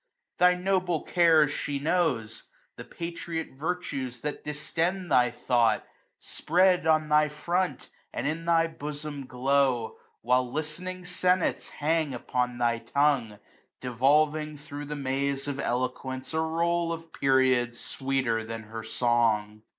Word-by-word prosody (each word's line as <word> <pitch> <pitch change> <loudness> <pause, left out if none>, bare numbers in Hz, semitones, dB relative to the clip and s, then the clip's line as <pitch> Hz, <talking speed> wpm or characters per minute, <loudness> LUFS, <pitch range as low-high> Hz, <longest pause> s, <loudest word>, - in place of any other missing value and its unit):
Thy 180 0 +6
noble 180 -3 0
cares 160 -4 +4
she 145 -1 -3
knows. 140 -8 0 0.3
The - - -8
patriot 170 -1 -5
virtues 135 -5 -4
that 150 0 -4
distend 170 +5 -2
thy 125 -1 +5
thought, 120 -2 +1 0.3
Spread 180 -1 +2
on 155 -1 +3
thy 150 0 +4
front, 175 +5 -2 0.2
and - - -4
in 160 +3 -2
thy 165 -1 +4
bosom 150 -3 -6
glow. 130 -2 +1 0.2
While 125 +1 +2
listening 175 +5 -4
senates 180 0 +1
hang 155 -2 0
upon 125 0 -2
thy 120 -1 +1
tongue; 140 -3 +1
15 105 -1 -14 0.4
Devolving 150 +5 +2
thro* 145 0 -8
the 150 +1 -5
maze 140 0 -2
of 140 -1 -3
eloquence 130 +2 -2
A 160 - +1
roll 170 +1 0
of 165 0 -7
periods, 130 -3 +2
sweeter 130 -4 -1
than 115 0 -6
her 110 +1 -7
song. 110 -2 +1
145 Hz, 130 wpm, -28 LUFS, 125-165 Hz, 0.4 s, Thy